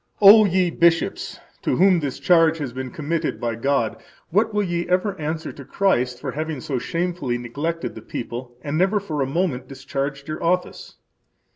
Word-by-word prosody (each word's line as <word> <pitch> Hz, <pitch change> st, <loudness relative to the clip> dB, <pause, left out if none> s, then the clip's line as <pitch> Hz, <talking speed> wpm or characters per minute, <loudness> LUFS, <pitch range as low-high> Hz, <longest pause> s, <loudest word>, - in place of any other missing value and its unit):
O 210 Hz, +2 st, +9 dB
ye 185 Hz, -2 st, +2 dB
bishops! 170 Hz, 0 st, +1 dB, 0.2 s
[to -, -, 0 dB
whom 185 Hz, -1 st, +5 dB
this 140 Hz, -4 st, -3 dB
charge 165 Hz, -2 st, +4 dB
has 140 Hz, -6 st, -4 dB
been 130 Hz, 0 st, -5 dB
committed 155 Hz, +4 st, -2 dB
by 120 Hz, -1 st, -1 dB
God,] 115 Hz, -1 st, 0 dB, 0.3 s
what 215 Hz, +5 st, +2 dB
will 210 Hz, 0 st, +1 dB
ye 175 Hz, -2 st, -2 dB
ever 185 Hz, +2 st, +1 dB
answer 155 Hz, +1 st, -3 dB
to 140 Hz, -, -11 dB
Christ 125 Hz, -8 st, 0 dB
for 135 Hz, -, -4 dB
having 155 Hz, 0 st, -4 dB
so 130 Hz, 0 st, -3 dB
shamefully 170 Hz, -5 st, -2 dB
neglected 145 Hz, +8 st, -4 dB
the -, -, -9 dB
people 120 Hz, +1 st, -6 dB
and 150 Hz, +2 st, -2 dB
never 195 Hz, +3 st, +3 dB
for 155 Hz, -8 st, -3 dB
a 135 Hz, -, +1 dB
moment 135 Hz, -4 st, -1 dB
discharged 140 Hz, +1 st, -4 dB
your 155 Hz, 0 st, -5 dB
office? 180 Hz, +2 st, -1 dB
155 Hz, 175 wpm, -22 LUFS, 135-180 Hz, 0.3 s, O